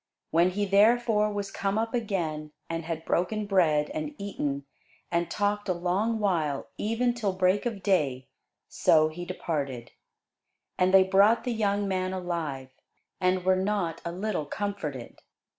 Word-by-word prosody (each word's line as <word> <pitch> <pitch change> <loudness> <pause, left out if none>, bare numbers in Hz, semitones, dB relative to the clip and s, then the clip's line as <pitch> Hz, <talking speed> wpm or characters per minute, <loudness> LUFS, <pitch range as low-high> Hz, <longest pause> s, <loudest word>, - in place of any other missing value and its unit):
When 170 +2 +4
he 205 +3 -1
therefore 210 +1 +3
was 205 -1 -4
come 195 +1 -1
up 225 +2 -1
again, 165 -10 -2
and 165 -1 -4
had 165 -1 -4
broken 210 +5 0
bread, 165 -7 +2
and 305 -1 -4
eaten, 145 -9 -3 0.5
and 170 0 0
talked 205 0 -1
a - - +3
long 190 +6 0
while, 165 -9 -1
even 235 +3 +1
till 215 -5 -1
break 185 +4 +2
of 210 -4 -5
day, 140 -10 +1 0.4
so 155 -1 +3
he 175 +3 -7
departed. 140 -9 -4 0.8
And 185 0 +2
they 190 0 +7
brought 200 +4 +4
the 245 - -1
young 205 -2 0
man 185 -1 -1
alive, 165 -8 -4 0.5
and 185 0 +1
were 185 0 +4
not 185 -4 -1
a 170 - -3
little 185 -4 -3
comforted. 180 - -5
185 Hz, 150 wpm, -27 LUFS, 165-205 Hz, 0.8 s, they